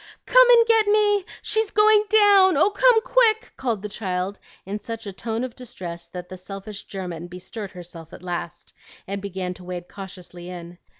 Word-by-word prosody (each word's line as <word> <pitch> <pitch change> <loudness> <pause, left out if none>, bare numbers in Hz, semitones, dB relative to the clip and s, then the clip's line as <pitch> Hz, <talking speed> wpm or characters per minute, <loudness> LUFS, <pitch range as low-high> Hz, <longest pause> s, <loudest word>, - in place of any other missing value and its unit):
"Come - - +6
and 470 -1 +7
get 450 -2 +3
me! 415 -2 +3 0.2
She's 440 -1 +1
going 425 0 +5
down! 400 -5 +6
Oh, 385 +8 +4
come, 480 +1 +5
quick!" 455 -4 +2
called 230 -6 -2
the - - -3
child 190 -1 -4 0.3
in 200 +2 -4
a 230 - -2
tone 225 +2 -5
of 255 - -4
such - - -31
distress 175 -9 -8
that 180 +1 -8
the 185 - -9
selfish 195 +2 -9
German 175 -3 -6
bestirred 185 +3 -8
herself 170 -3 -11
at - - -12
last, 175 -1 -6 0.3
and 200 +1 -5
began 190 -2 -4
to 180 - -14
wade 180 -1 -6
cautiously 180 -2 -10
in. 175 0 -9
200 Hz, 180 wpm, -23 LUFS, -, 0.3 s, and